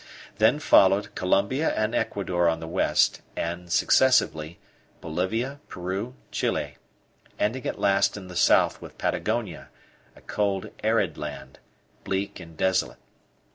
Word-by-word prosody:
Then 110 +7 +4
followed 100 -8 +4
Colombia 115 +11 +1
and 110 +1 0
Ecuador 90 -5 0
on 80 0 -1
the 80 - -7
west; 90 +3 +2
and, 85 +1 -4
successively, 85 -8 +3 0.4
Bolivia, 110 - -2
Peru, 95 +7 -5 0.2
Chile, - - -2 0.6
ending 120 +5 -1
at - - -3
last 100 +1 +2
in 95 -2 -9
the 90 - -10
south - - +3
with - - -11
Patagonia, 110 -7 -2 0.5
a - - -17
cold 100 -2 -2
arid - - +1
land, - - -7 0.4
bleak 95 0 -3
and 85 -3 -12
desolate. 95 0 0
95 Hz, 125 wpm, -26 LUFS, 90-110 Hz, 0.6 s, Then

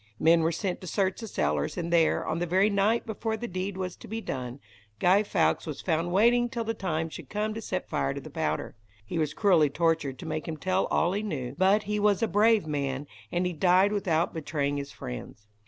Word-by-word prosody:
Men 165 +1 +5
were 165 +1 +2
sent 180 +2 -3
to 185 - -8
search 190 +4 0
the 225 - -5
cellars, 75 - -1
and 170 -1 -2
there, 165 -2 +3
on 160 +1 -1
the 175 - -1
very 190 +5 +3
night 205 +4 +2
before 220 0 -3
the 240 - -5
deed 185 0 -4
was 185 -2 -3
to - - -12
be 225 +1 -4
done, 125 - -5 0.4
Guy 185 - +4
Fawkes 185 -5 +1
was 150 - -5
found 170 0 0
waiting 240 +5 +4
till 235 -2 -3
the 225 0 -2
time 165 -6 -2
should 160 - -10
come 215 +1 -1
to 225 - -5
set 185 -4 -3
fire 70 0 -1
to - - -4
the - - -11
powder. - - -2 0.3
He 135 - -3
was 150 -1 -1
cruelly 175 -8 +4
tortured 160 -3 0
to - - -9
make 155 -1 -3
him 160 -1 -4
tell 185 +3 0
all 175 +2 +1
he 205 - -1
knew, 135 - -4
but 195 +5 +3
he 210 +1 -1
was 205 0 +2
a - - +3
brave 215 -1 +4
man, 140 -2 -2 0.3
and 175 +1 0
he 180 - -1
died 185 +5 +4
without 175 -5 0
betraying 145 -3 -2
his 140 0 -5
friends. 65 - -8
180 Hz, 230 wpm, -28 LUFS, 155-205 Hz, 0.4 s, Men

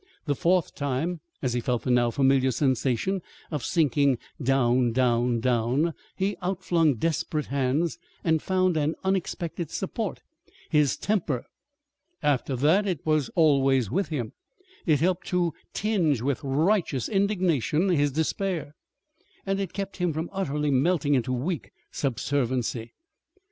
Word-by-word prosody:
The 145 - +1
fourth 175 +4 +1
time, 145 +5 -2 0.2
as 125 -2 0
he 120 - 0
felt 125 -1 -1
the 125 - 0
now 120 -1 +4
familiar 135 +1 +3
sensation 130 - 0 0.3
of 150 -5 -3
sinking 140 -4 +2 0.2
down, 125 -2 +2
down, 120 -1 +2
down, 125 +7 +1 0.2
he 195 +2 -1
outflung 175 -5 +1
desperate 160 +2 -1
hands 140 +5 0 0.2
and 160 -2 +2
found 185 -2 +1
an 155 +1 0
unexpected 175 -3 -2
support - - -3 0.5
his 150 -3 +3
temper. 170 - -1 0.8
After 140 -2 +1
that 160 +11 +3
it 180 -7 -2
was 155 -5 +1
always 135 - +3
with 195 +2 0
him. 125 -9 -4 0.5
It 155 -3 +3
helped 180 +1 +1
to 175 -2 +1 0.2
tinge 180 - +1
with 135 +3 -1
righteous 150 - +1
indignation 185 - +1
his 145 -5 +2
despair, 160 0 -2 0.7
and 195 0 0
it 195 -3 -3
kept 195 0 -5
him 180 -3 0
from 160 +3 -4
utterly 150 -6 -1
melting 145 +2 +2
into 130 -1 +1
weak 145 +7 -2 0.2
subserviency. 125 -3 -1
150 Hz, 135 wpm, -26 LUFS, 130-175 Hz, 0.8 s, now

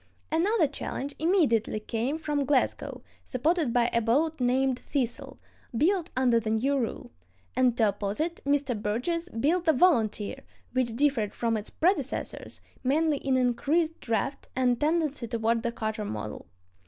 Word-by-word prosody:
Another 350 +3 +3
challenge 280 0 -4
immediately 300 - +2
came 235 +7 -2
from 295 -3 -1
Glasgow, 275 -1 0 0.2
supported 295 +2 0
by 240 0 +3
a 235 - +3
boat 295 +8 +1
named 255 +1 +2
Thistle, 255 -5 -3 0.4
built 355 - +2
under 245 -3 +4
the 220 -1 -4
new 245 +6 +1
rule; 245 -5 -3 0.4
and 250 -2 +3
to 220 -3 +4
oppose 200 +2 -3
it 335 +2 -2
Mr. 280 -3 +1
Burgess 245 - -2
built 330 +9 0
the 320 - +5
Volunteer, 250 - +2 0.3
which 250 -3 0
differed 250 -6 +1
from 230 -1 0
its 215 0 -3
predecessors 370 +5 -1 0.2
mainly 300 +3 +2
in 270 -1 0
increased 295 +7 +1
draft 230 +5 -2
and 250 -2 +2
tendency 300 -5 0
toward 230 0 0
the 235 - -1
cutter 220 -2 -3
model. 105 - -5
260 Hz, 145 wpm, -28 LUFS, 230-310 Hz, 0.4 s, the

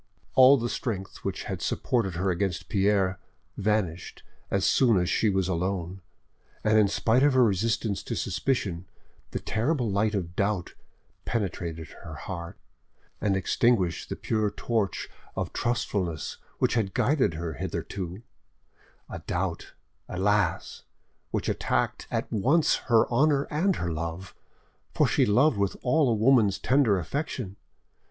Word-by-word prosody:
All 130 +2 +8
the 120 -1 -2
strength 100 -5 -4
which - - -4
had - - -5
supported 105 -8 0
her 95 +2 0
against 90 0 -2
Pierre 95 -2 +2 0.4
vanished 100 -5 -1 0.3
as 100 -1 +1
soon 120 -6 +4
as 90 -1 +1
she 110 - +2
was 95 -2 +1
alone, 95 0 -2 0.6
and 110 0 +4
in 105 - +5
spite 115 +5 +2
of 145 0 +4
her 130 - +6
resistance 110 0 0
to - - -3
suspicion, 95 -10 -1 0.4
the - - -3
terrible 120 0 -1
light 105 +2 +1
of 90 -3 -3
doubt 100 -3 -1 0.5
penetrated 85 -7 -3
her - - -8
heart, 85 -2 -7 0.6
and 100 -2 +2
extinguished 95 -2 +1
the - - -3
pure 110 -2 0
torch 105 -2 -2 0.3
of - - -3
trustfulness 100 -9 -2 0.2
which - - +1
had 105 -6 -1
guided 130 - +2
her 85 0 -4
hitherto—a 95 - -8
doubt, 85 -1 -3 0.4
alas! 95 -1 0 0.5
which - - -2
attacked - - -1
at - - -1
once 135 - +3
her 115 -3 +4
honour 140 +3 +3
and 175 +5 +2
her 85 -1 -2
love, 85 +3 -5 0.6
for - - +4
she - - +2
loved 125 +4 +4
with 100 -1 0
all 145 +1 +3
a 115 - +2
woman's 110 -3 +4
tender 125 -6 +3
affection. 110 - -4
100 Hz, 135 wpm, -27 LUFS, 90-120 Hz, 0.6 s, All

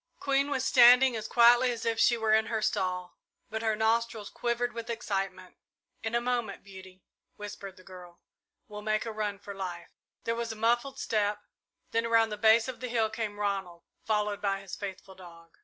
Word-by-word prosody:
Queen 275 0 +1
was 265 -2 -1
standing 250 0 +7
as 220 -1 -4
quietly 240 +1 +5
as 230 -2 -5
if 225 -1 0
she 240 +1 +4
were 220 -1 +1
in 220 0 +3
her 225 - -1
stall, 185 -4 -2 0.3
but 220 0 -3
her 220 -1 +1
nostrils 220 -1 0
quivered 240 0 -2
with 230 0 -7
excitement. 195 -5 -4 0.4
"In 225 +1 -3
a - - +3
moment, 240 -4 -2
Beauty," 190 -2 -13 0.3
whispered 205 -2 -8
the 185 - -16
girl, 180 -2 -13 0.5
"we'll 210 -2 -8
make 215 +1 -1
a 225 - -4
run 210 -2 -3
for 200 0 -9
life." 180 -3 -6 0.3
There 230 - -1
was 230 0 -3
a - - -6
muffled 240 +5 0
step, 210 -3 -1 0.5
then 230 0 0
around 225 -1 +3
the 210 - -5
base 225 +2 +5
of 255 -2 -6
the 255 - -4
hill 225 -2 +1
came 215 -2 -4
Ronald, 195 -4 -3 0.2
followed 210 -2 -1
by 195 -1 0
his 195 -2 -8
faithful 195 -1 -8
dog. 170 -3 -15
220 Hz, 190 wpm, -29 LUFS, 195-235 Hz, 0.5 s, standing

